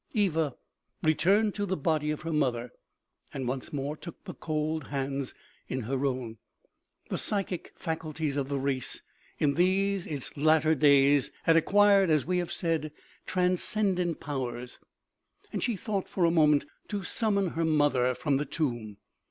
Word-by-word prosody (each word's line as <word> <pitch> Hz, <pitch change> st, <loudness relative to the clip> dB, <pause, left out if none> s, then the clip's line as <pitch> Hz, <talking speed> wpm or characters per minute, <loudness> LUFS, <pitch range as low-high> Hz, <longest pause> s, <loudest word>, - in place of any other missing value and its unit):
Eva 165 Hz, -, +1 dB, 0.5 s
returned 195 Hz, +7 st, +3 dB
to 205 Hz, -, -3 dB
the 190 Hz, -1 st, -1 dB
body 150 Hz, 0 st, 0 dB
of 150 Hz, -, -2 dB
her 165 Hz, 0 st, -3 dB
mother, 125 Hz, -5 st, 0 dB, 0.6 s
and 130 Hz, -2 st, -3 dB
once 130 Hz, +1 st, -4 dB
more 145 Hz, +1 st, -3 dB
took 170 Hz, +2 st, -11 dB
the -, -, -7 dB
cold 155 Hz, -1 st, -2 dB
hands 135 Hz, -1 st, -3 dB, 0.3 s
in 130 Hz, -, -3 dB
her 135 Hz, +4 st, -1 dB
own. 125 Hz, -4 st, -4 dB, 0.7 s
The -, -, -1 dB
psychic 195 Hz, -4 st, -2 dB
faculties 155 Hz, -3 st, -3 dB
of 140 Hz, -1 st, -2 dB
the 140 Hz, -, -1 dB
race 135 Hz, -2 st, -2 dB, 0.3 s
in 145 Hz, -2 st, +2 dB
these 190 Hz, +3 st, +1 dB
its 145 Hz, -5 st, -5 dB
latter 155 Hz, +1 st, +4 dB
days 140 Hz, -1 st, +4 dB
had 165 Hz, -, +4 dB
ac 165 Hz, -, +4 dB
quired, 200 Hz, -2 st, +5 dB
as 155 Hz, -3 st, +3 dB
we 180 Hz, +1 st, +1 dB
have 175 Hz, -, -3 dB
said, 160 Hz, -3 st, -1 dB, 0.4 s
transcendent 180 Hz, -1 st, 0 dB
powers, 125 Hz, -3 st, -5 dB, 0.7 s
and -, -, -2 dB
she 240 Hz, -3 st, 0 dB
thought 200 Hz, 0 st, -3 dB
for 180 Hz, -, +1 dB
a 165 Hz, -, +4 dB
moment 150 Hz, -3 st, +4 dB, 0.2 s
to 205 Hz, -2 st, -3 dB
summon 200 Hz, -1 st, +1 dB
her 165 Hz, 0 st, -2 dB
mother 145 Hz, -5 st, +2 dB
from 140 Hz, 0 st, 0 dB
the 145 Hz, -, -1 dB
tomb. 120 Hz, -9 st, -3 dB
155 Hz, 160 wpm, -29 LUFS, 140-180 Hz, 0.7 s, quired